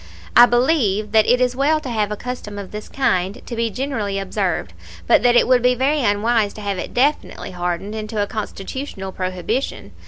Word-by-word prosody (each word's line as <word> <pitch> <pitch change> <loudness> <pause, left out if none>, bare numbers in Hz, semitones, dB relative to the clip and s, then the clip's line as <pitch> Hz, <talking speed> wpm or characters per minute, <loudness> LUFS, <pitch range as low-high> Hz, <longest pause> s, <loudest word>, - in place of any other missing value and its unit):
I 240 0 +9
believe 240 -6 +1
that 220 -1 +4
it 245 +1 +4
is 250 0 +1
well 295 +4 +2
to 280 - -7
have 215 -3 -1
a - - -1
custom 230 -3 -6
of 200 -2 -7
this 210 0 -7
kind, 200 -5 0
to 240 - -6
be 230 0 0
generally 220 -4 -3
observed, 190 - -2 0.3
but - - +5
that 245 0 +4
it - - +5
would 250 -1 +4
be 250 +1 +3
very 280 +4 +1
unwise 210 0 +1
to 215 - -9
have 200 -2 -2
it - - -6
definitely 280 -3 0
hardened 180 +3 -3
into 215 0 -4
a 205 - +2
Constitutional 205 0 -6
prohibition. 185 +8 -3
220 Hz, 195 wpm, -20 LUFS, 200-250 Hz, 0.3 s, I